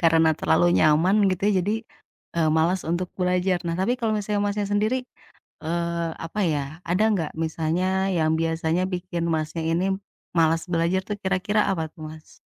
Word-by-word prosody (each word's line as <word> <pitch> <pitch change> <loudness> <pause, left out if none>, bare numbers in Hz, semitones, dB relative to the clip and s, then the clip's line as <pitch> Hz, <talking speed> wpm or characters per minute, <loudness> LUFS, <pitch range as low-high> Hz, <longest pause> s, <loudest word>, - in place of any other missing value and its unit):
karena 165 -1 +4
terlalu - - +3
nyaman 160 +6 +4 0.2
gitu 185 0 -3
ya - - +3
jadi, 190 +3 0 0.6
eee, 165 -2 +2
malas 175 +4 +2
untuk 175 +1 -1
belajar. 180 0 +1
Nah, 165 - -1
tapi 215 +6 +2
kalo 230 -3 0
misalnya 210 0 -1
Masnya 205 0 -1
sendiri, 215 +5 +2 0.7
eee, 170 +1 -1 0.2
apa 185 +6 -4
ya, 145 - 0 0.3
ada 185 +5 +2
nggak 165 -7 -1
misalnya 160 +2 -1 0.3
yang 155 -1 +2
biasanya 165 +1 0
bikin 175 -1 -3
Masnya 155 +1 -2
ini 170 +3 +1 0.5
malas 165 0 +3
belajar 170 +3 +2
tuh 210 - -1
kira-kira 195 +3 +1
apa 180 -4 -1
tuh 155 - -13
Mas? 155 0 -13
170 Hz, 165 wpm, -24 LUFS, 165-190 Hz, 0.7 s, karena